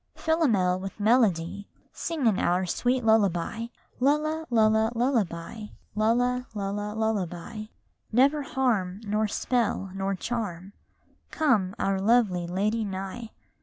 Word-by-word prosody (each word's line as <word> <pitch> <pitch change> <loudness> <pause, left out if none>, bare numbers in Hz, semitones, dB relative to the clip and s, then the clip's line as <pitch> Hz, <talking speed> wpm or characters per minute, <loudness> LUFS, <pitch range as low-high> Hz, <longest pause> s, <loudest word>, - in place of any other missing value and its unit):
Chorus - - -16
Philomel 220 - +2
with 195 +2 -7
melody 205 -4 +2 0.3
Sing 320 -6 -3
in 215 -4 +3
our 180 +2 +1
sweet 245 +8 0
lullaby! 220 0 +2 0.3
Lulla, 305 +4 +1
lulla, 220 -1 +3
lullaby; 220 -5 -1 0.3
lulla, 245 +3 +1
lulla, 205 +1 -3
lullaby! 215 -1 -2 0.5
Never 275 +6 +4
harm, 225 -9 -1
nor 215 +1 0
spell, 215 -3 -1
nor 195 0 -2
charm, 200 -4 -4 0.6
Come 220 - +1
our 195 -1 0
lovely 200 -5 +2
lady 210 +5 0
nigh 195 +3 -5
215 Hz, 115 wpm, -27 LUFS, 195-245 Hz, 0.6 s, Never